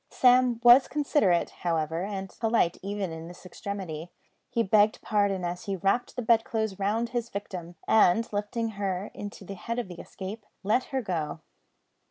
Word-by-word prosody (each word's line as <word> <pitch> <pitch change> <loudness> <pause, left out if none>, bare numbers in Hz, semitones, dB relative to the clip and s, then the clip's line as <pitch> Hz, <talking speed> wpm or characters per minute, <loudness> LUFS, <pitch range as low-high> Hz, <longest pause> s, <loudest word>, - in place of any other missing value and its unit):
Sam 250 -2 +4
was 245 +2 +8
considerate, 250 - +2
however, 165 0 0
and 195 -1 -5
polite 225 -6 +2
even 200 -2 -3
in 160 0 -7
this 175 +2 -12
extremity. 180 -4 -6 0.4
He 230 -1 +1
begged 210 +1 +4
pardon 200 -3 +1
as 175 +4 -4
he 200 -2 -1
wrapped 195 +6 0
the 250 - -3
bedclothes 220 -3 +1
round 220 +4 0
his 240 -1 -2
victim, 180 -4 -6
and 220 +1 +4
lifting 210 +3 -1
her 200 -2 -3
into 205 -1 -8
the 195 - -6
head 230 +5 -5
of 240 -6 -3
the 175 - -9
escape, 200 +3 -8 0.2
let 220 +6 +2
her 265 -2 -2
go. 160 -5 -3
200 Hz, 165 wpm, -28 LUFS, 180-230 Hz, 0.4 s, was